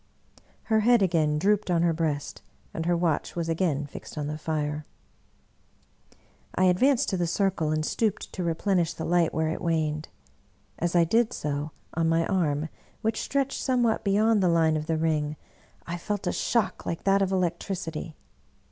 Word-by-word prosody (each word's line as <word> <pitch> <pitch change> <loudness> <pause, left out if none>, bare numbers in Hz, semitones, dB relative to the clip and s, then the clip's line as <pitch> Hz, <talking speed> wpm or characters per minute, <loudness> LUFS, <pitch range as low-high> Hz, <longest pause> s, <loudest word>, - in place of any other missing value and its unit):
Her 220 -1 +2
head 235 0 +4
again 160 -5 +2
drooped 205 +4 +1
on 170 -1 +2
her 170 -1 +3
breast, 155 -3 -2 0.3
and 165 0 -3
her 175 -1 +3
watch 165 -3 0
was 170 -1 -2
again 160 -4 0
fixed 145 - -10
on 150 - -2
the 150 +1 -3
fire. 150 -1 -2 1.7
I 185 - +2
advanced 250 +9 +4
to 190 - -1
the 175 -1 0
circle 180 -3 0
and 155 0 0
stooped 220 +2 -1
to 185 - -3
replenish 170 +1 +1
the 160 - -4
light 175 -1 +2
where 160 0 0
it 160 - -3
waned. 155 -2 -1 0.7
As 175 +1 -1
I 170 - +6
did 225 +7 +2
so, 145 +1 -3 0.2
on 165 0 +1
my 165 0 +2
arm, 160 -5 0 0.3
which 220 0 0
stretched 275 -1 -1
somewhat 245 -4 +1
beyond 210 +2 +3
the 180 - +3
line 165 -2 +3
of 155 0 -3
the 160 - +1
ring, 155 -2 0 0.5
I 170 +1 -4
felt 205 +3 -3
a - - +1
shock 235 -4 0
Uke 165 - -3
that 195 0 +3
of 195 -1 +1
electricity. 170 -3 -2
170 Hz, 175 wpm, -27 LUFS, 155-195 Hz, 1.7 s, I